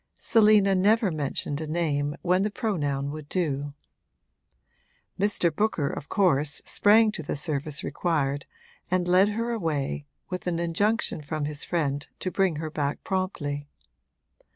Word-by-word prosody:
Selina 210 Hz, -3 st, +5 dB
never 205 Hz, +2 st, +3 dB
mentioned 145 Hz, -1 st, -2 dB
a 155 Hz, -, -4 dB
name 145 Hz, -3 st, 0 dB
when 180 Hz, +1 st, +3 dB
the 210 Hz, -, +1 dB
pronoun 145 Hz, -, -2 dB
would 155 Hz, -1 st, -8 dB
do. 145 Hz, -5 st, -2 dB, 1.4 s
Mr. 185 Hz, -5 st, +1 dB
Booker 205 Hz, -8 st, +1 dB
of 145 Hz, -, -7 dB
course 150 Hz, -7 st, +2 dB
sprang 215 Hz, +1 st, +5 dB
to 210 Hz, -, -6 dB
the 145 Hz, -, -3 dB
service 150 Hz, -1 st, -1 dB
required 145 Hz, -5 st, -1 dB, 0.4 s
and 180 Hz, -1 st, +1 dB
led 185 Hz, +3 st, +5 dB
her 230 Hz, +3 st, -2 dB
away, 150 Hz, -8 st, -2 dB, 0.2 s
with 180 Hz, 0 st, -5 dB
an 170 Hz, -2 st, 0 dB
injunction 170 Hz, +3 st, 0 dB
from 150 Hz, 0 st, -3 dB
his 150 Hz, -1 st, -3 dB
friend 145 Hz, -5 st, -1 dB
to 185 Hz, -, -3 dB
bring 190 Hz, -4 st, +1 dB
her 155 Hz, +1 st, -4 dB
back 145 Hz, -2 st, -2 dB
promptly. 145 Hz, -7 st, -2 dB
165 Hz, 140 wpm, -26 LUFS, 145-195 Hz, 1.4 s, Selina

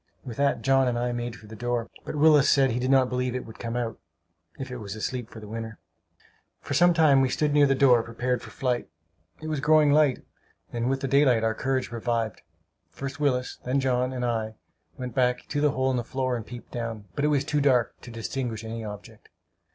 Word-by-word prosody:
With 120 Hz, -3 st, -7 dB
that 140 Hz, 0 st, +1 dB
John 135 Hz, -1 st, +4 dB
and 120 Hz, -1 st, 0 dB
I 120 Hz, +1 st, -1 dB
made 120 Hz, -1 st, -4 dB
for 110 Hz, -, -14 dB
the 110 Hz, +1 st, -10 dB
door; 120 Hz, +1 st, -2 dB, 0.2 s
but -, -, -5 dB
Willis 150 Hz, -2 st, +5 dB
said 135 Hz, -2 st, +4 dB
he 120 Hz, -, -1 dB
did 130 Hz, +1 st, -1 dB
not 135 Hz, -1 st, +5 dB
believe 125 Hz, 0 st, -2 dB
it 130 Hz, -, -4 dB
would 110 Hz, -, -12 dB
come 115 Hz, 0 st, -4 dB
out, 120 Hz, -2 st, -3 dB, 0.6 s
if 130 Hz, -1 st, -6 dB
it 125 Hz, -, -5 dB
was 105 Hz, -3 st, -6 dB
asleep 120 Hz, +2 st, -4 dB
for 110 Hz, -, -10 dB
the 105 Hz, -, -10 dB
winter. 110 Hz, 0 st, -6 dB, 0.8 s
For -, -, -5 dB
some 175 Hz, 0 st, +5 dB
time 150 Hz, -5 st, +5 dB
we 130 Hz, -, +2 dB
stood 150 Hz, +3 st, 0 dB
near 145 Hz, -1 st, +5 dB
the 135 Hz, -, +2 dB
door, 130 Hz, -3 st, +5 dB
prepared 120 Hz, +2 st, -2 dB
for -, -, -10 dB
flight. 125 Hz, -3 st, -2 dB, 0.5 s
It -, -, -4 dB
was 155 Hz, -2 st, -2 dB
growing 150 Hz, 0 st, +4 dB
light, 145 Hz, -3 st, +3 dB, 0.5 s
and 120 Hz, +1 st, -1 dB
with 135 Hz, 0 st, -1 dB
the 135 Hz, -, -1 dB
daylight 130 Hz, -4 st, +4 dB
our 110 Hz, 0 st, +2 dB
courage 130 Hz, +1 st, -1 dB
revived. 115 Hz, -2 st, -2 dB, 0.5 s
First 140 Hz, +1 st, -7 dB
Willis, 125 Hz, -4 st, 0 dB
then 130 Hz, +2 st, 0 dB
John 125 Hz, -1 st, +1 dB
and 125 Hz, -1 st, -2 dB
I, 110 Hz, -2 st, -2 dB, 0.4 s
went 125 Hz, -3 st, -5 dB
back 125 Hz, 0 st, +1 dB
to 145 Hz, -, -1 dB
the 150 Hz, -, +4 dB
hole 130 Hz, -1 st, 0 dB
in 130 Hz, -, 0 dB
the 120 Hz, -, -1 dB
floor 130 Hz, +1 st, -2 dB
and 115 Hz, -3 st, -6 dB
peeped 120 Hz, 0 st, -10 dB
down; 115 Hz, -3 st, -5 dB
but 145 Hz, -, -2 dB
it -, -, +4 dB
was 145 Hz, -2 st, +1 dB
too 150 Hz, -1 st, 0 dB
dark 130 Hz, -4 st, +3 dB
to -, -, -11 dB
distinguish 115 Hz, 0 st, -4 dB
any 115 Hz, 0 st, -5 dB
object. 105 Hz, -1 st, -10 dB
125 Hz, 230 wpm, -26 LUFS, 115-135 Hz, 0.8 s, Willis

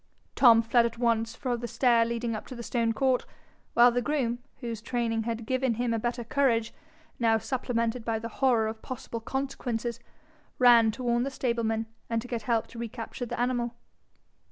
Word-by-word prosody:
Tom 230 Hz, -3 st, +6 dB
fled 235 Hz, +1 st, +4 dB
at 235 Hz, 0 st, -9 dB
once 230 Hz, -1 st, +1 dB
for 250 Hz, -2 st, -2 dB
the 240 Hz, 0 st, -5 dB
stair 235 Hz, 0 st, +3 dB
leading 235 Hz, 0 st, -2 dB
up 215 Hz, -, -7 dB
to 255 Hz, -, -8 dB
the 235 Hz, -, -7 dB
stone 230 Hz, -1 st, 0 dB
court, 260 Hz, +2 st, +1 dB, 0.5 s
while 240 Hz, +1 st, +7 dB
the 245 Hz, +1 st, 0 dB
groom, 245 Hz, -4 st, -1 dB, 0.2 s
whose 230 Hz, -4 st, -5 dB
training 230 Hz, -2 st, -1 dB
had 230 Hz, -1 st, -3 dB
given 255 Hz, -1 st, 0 dB
him 240 Hz, 0 st, 0 dB
a 225 Hz, -, 0 dB
better 240 Hz, +1 st, -2 dB
courage, 230 Hz, -3 st, +1 dB, 0.5 s
now 225 Hz, -2 st, +4 dB
supplemented 235 Hz, 0 st, -2 dB
by 225 Hz, -1 st, -1 dB
the 225 Hz, +1 st, -5 dB
horror 245 Hz, -4 st, +4 dB
of 220 Hz, 0 st, -4 dB
possible 245 Hz, -2 st, -6 dB
consequences, 240 Hz, -2 st, -3 dB, 0.6 s
ran 240 Hz, -3 st, +6 dB
to 250 Hz, +4 st, -5 dB
warn 240 Hz, -1 st, +2 dB
the 270 Hz, -, -1 dB
stablemen 230 Hz, -4 st, -1 dB, 0.2 s
and 230 Hz, +1 st, -1 dB
get 235 Hz, -2 st, -3 dB
help 225 Hz, 0 st, 0 dB
to 230 Hz, -, -11 dB
recapture 235 Hz, +1 st, -5 dB
the -, -, -5 dB
animal. 240 Hz, -1 st, 0 dB
235 Hz, 180 wpm, -28 LUFS, 230-245 Hz, 0.6 s, while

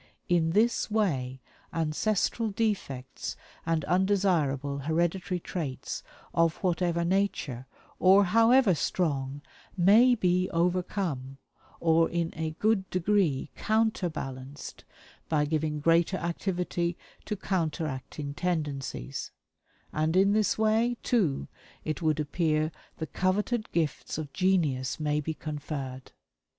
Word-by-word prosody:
IN 170 Hz, -2 st, +3 dB
THIS 230 Hz, +4 st, +2 dB
WAY 135 Hz, -12 st, 0 dB, 0.3 s
ANCESTRAL 200 Hz, +7 st, 0 dB
DEFECTS 140 Hz, -, -2 dB, 0.3 s
AND 165 Hz, -1 st, +1 dB
UNDESIRABLE 175 Hz, -8 st, +1 dB
HEREDITARY 170 Hz, +5 st, 0 dB
TRAITS, 155 Hz, -7 st, -4 dB, 0.3 s
OF 165 Hz, -1 st, +3 dB
WHATEVER 170 Hz, -1 st, +1 dB
NATURE 170 Hz, -9 st, -1 dB, 0.3 s
OR 190 Hz, +2 st, +7 dB
HOWEVER 230 Hz, +2 st, +5 dB
STRONG, 145 Hz, -4 st, -1 dB, 0.3 s
MAY 220 Hz, +8 st, +6 dB
BE 180 Hz, -3 st, +1 dB
OVERCOME, 170 Hz, -6 st, -1 dB, 0.4 s
OR 165 Hz, 0 st, +3 dB
IN 170 Hz, -1 st, -1 dB
A 160 Hz, 0 st, -2 dB
GOOD 210 Hz, -3 st, +1 dB
DEGREE 180 Hz, -7 st, +1 dB
COUNTERBALANCED 155 Hz, -11 st, -2 dB, 0.4 s
BY 150 Hz, -2 st, +2 dB
GIVING 155 Hz, 0 st, -1 dB
GREATER 170 Hz, +4 st, +3 dB
ACTIVITY 175 Hz, 0 st, -2 dB, 0.3 s
TO 210 Hz, -, -3 dB
COUNTERACTING 155 Hz, -6 st, -3 dB
TENDENCIES; 145 Hz, -, -3 dB, 0.6 s
and, 155 Hz, +2 st, 0 dB
in 195 Hz, +2 st, +5 dB
this 215 Hz, -1 st, +2 dB
way, 220 Hz, +2 st, +2 dB
too, 165 Hz, -, +1 dB, 0.4 s
it 155 Hz, +2 st, -2 dB
would 155 Hz, -2 st, +1 dB
appear 155 Hz, 0 st, 0 dB, 0.3 s
the 160 Hz, -, -3 dB
coveted 210 Hz, +7 st, -1 dB
gifts 155 Hz, -4 st, -1 dB
of 155 Hz, -3 st, -6 dB
genius 155 Hz, -10 st, +1 dB
may 150 Hz, -1 st, +1 dB
be 160 Hz, +2 st, -3 dB
conferred. 140 Hz, -4 st, -6 dB
170 Hz, 105 wpm, -28 LUFS, 150-190 Hz, 0.6 s, OR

